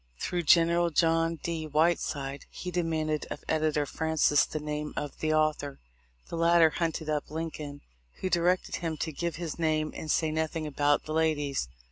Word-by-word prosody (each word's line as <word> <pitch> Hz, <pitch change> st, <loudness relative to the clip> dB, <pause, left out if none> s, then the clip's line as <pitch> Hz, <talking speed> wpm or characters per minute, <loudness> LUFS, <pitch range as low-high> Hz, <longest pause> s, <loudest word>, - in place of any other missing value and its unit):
Through 175 Hz, -, -1 dB
General 170 Hz, 0 st, +5 dB
John 165 Hz, +1 st, +2 dB
D. 165 Hz, -2 st, -3 dB
Whiteside 150 Hz, -3 st, 0 dB
he 180 Hz, -, -6 dB
demanded 160 Hz, -3 st, -1 dB
of -, -, -6 dB
edi 155 Hz, 0 st, +2 dB
tor 150 Hz, -1 st, +1 dB
Francis 160 Hz, -1 st, +2 dB
the 155 Hz, -, -4 dB
name 150 Hz, 0 st, -4 dB
of 145 Hz, -1 st, -4 dB
the 155 Hz, -, 0 dB
author. 155 Hz, -2 st, 0 dB, 0.5 s
The 170 Hz, -, -4 dB
latter 165 Hz, -1 st, +5 dB
hunted 160 Hz, -2 st, -2 dB
up 150 Hz, -1 st, -1 dB
Lincoln, 155 Hz, -2 st, -5 dB, 0.3 s
who -, -, -4 dB
directed 180 Hz, 0 st, +1 dB
him 165 Hz, -3 st, -3 dB
to 160 Hz, -, -2 dB
give 170 Hz, +3 st, -3 dB
his 170 Hz, -1 st, -5 dB
name 155 Hz, -1 st, +1 dB
and 155 Hz, -, -6 dB
say 160 Hz, +1 st, +2 dB
nothing 160 Hz, 0 st, -2 dB
about 145 Hz, 0 st, +2 dB
the 155 Hz, -, -4 dB
ladies. 145 Hz, -, 0 dB
155 Hz, 170 wpm, -29 LUFS, 150-165 Hz, 0.5 s, General